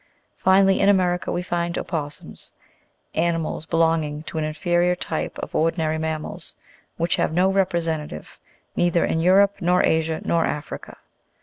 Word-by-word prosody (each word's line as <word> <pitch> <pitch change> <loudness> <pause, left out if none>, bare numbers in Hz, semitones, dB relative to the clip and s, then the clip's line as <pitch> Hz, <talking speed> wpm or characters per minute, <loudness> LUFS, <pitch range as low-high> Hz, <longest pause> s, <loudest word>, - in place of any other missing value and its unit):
Finally, 190 0 +4
in 200 - +4
America, 180 -3 +2
we 180 - -2
find 175 -1 -2
opossums, 150 -4 -6 0.6
animals 165 -1 -1
belong 165 -1 +2
ing 150 0 -6
to 160 - -5
an - - -1
inferior 175 +3 +1
type 160 -3 -4
of - - -6
ordinary 160 -1 0
mammals, 160 -1 -4 0.4
which 170 +1 0
have - - +1
no 180 +4 +3
representative, 165 - -2 0.4
neither 175 -1 +2
in 160 - 0
Europe, 195 +4 +4
nor 180 +1 +3
Asia, 160 0 +1
nor 170 -1 +2
Africa. 150 -1 -5
170 Hz, 140 wpm, -23 LUFS, 160-180 Hz, 0.6 s, Finally